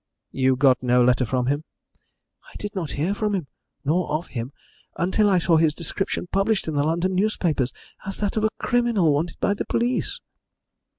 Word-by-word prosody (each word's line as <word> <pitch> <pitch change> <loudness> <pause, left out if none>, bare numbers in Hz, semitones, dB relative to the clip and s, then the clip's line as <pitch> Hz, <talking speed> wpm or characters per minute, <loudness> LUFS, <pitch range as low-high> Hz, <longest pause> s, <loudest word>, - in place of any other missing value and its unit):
"You 130 0 +2
got 130 -1 +4
no 125 0 +3
letter 125 +1 +3
from 125 +1 0
him?" 145 +4 0 0.9
"I - - -19
did 205 0 -6
not 175 -6 -4
hear 165 +7 +1
from 210 0 -1
him 180 -6 -2 0.4
nor 170 +6 +1
of 155 +4 -2
him 120 +1 -5 0.5
until 190 +6 +2
I 190 - +4
saw 170 -1 +3
his 160 -2 +3
description 180 +4 -3
published 195 0 +1
in 160 - -2
the 145 - +1
London 170 +5 0
newspapers 175 - 0 0.3
as 195 -2 -5
that 205 -2 -2
of 215 - 0
a - - +3
criminal 235 -10 +2
wanted 160 +4 -2
by 200 - +2
the 205 - -3
police." 245 +2 -1
170 Hz, 185 wpm, -24 LUFS, 145-200 Hz, 0.9 s, got